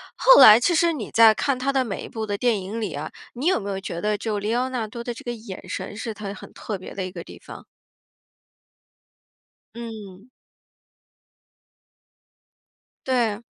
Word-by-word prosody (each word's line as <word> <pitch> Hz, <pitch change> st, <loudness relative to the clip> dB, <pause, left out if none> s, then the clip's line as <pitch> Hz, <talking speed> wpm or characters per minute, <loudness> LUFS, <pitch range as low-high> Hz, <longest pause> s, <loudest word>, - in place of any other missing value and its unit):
后 -, -, +7 dB
来 215 Hz, +2 st, +10 dB
其 345 Hz, +7 st, +2 dB
实 335 Hz, 0 st, +3 dB
你 235 Hz, -9 st, -6 dB
在 225 Hz, -1 st, +6 dB
看 270 Hz, +3 st, -1 dB
他 275 Hz, +2 st, -1 dB
的 265 Hz, -1 st, +2 dB
每 215 Hz, -5 st, -5 dB
一 -, -, -7 dB
部 220 Hz, -1 st, -5 dB
的 205 Hz, 0 st, -2 dB
电 230 Hz, -5 st, +1 dB
影 205 Hz, +5 st, -5 dB
里 205 Hz, -8 st, -3 dB
啊， 145 Hz, +2 st, -5 dB, 0.2 s
你 270 Hz, +8 st, -3 dB
有 375 Hz, -, +3 dB
没 200 Hz, -1 st, -5 dB
有 195 Hz, -, -3 dB
觉 170 Hz, -3 st, -6 dB
得 210 Hz, +2 st, 0 dB
就 215 Hz, -2 st, -2 dB
里 210 Hz, +3 st, -2 dB
奥 255 Hz, +1 st, 0 dB
纳 245 Hz, -4 st, -3 dB
多 235 Hz, +2 st, -8 dB
的 240 Hz, -1 st, -5 dB
这 -, -, -11 dB
个 240 Hz, -, -4 dB
眼 220 Hz, -4 st, -10 dB
神 205 Hz, -, -6 dB
是 225 Hz, 0 st, -4 dB
他 205 Hz, -1 st, -7 dB
很 -, -, -11 dB
特 210 Hz, -3 st, -5 dB
别 185 Hz, -, -10 dB
的 190 Hz, -, -4 dB
一 185 Hz, -, -7 dB
个 170 Hz, -2 st, -8 dB
地 -, -, -13 dB
方？ -, -, -11 dB, 2.1 s
嗯。 220 Hz, -2 st, -9 dB, 2.8 s
对。 235 Hz, -5 st, +1 dB
220 Hz, 200 characters per minute, -23 LUFS, 200-245 Hz, 2.8 s, 来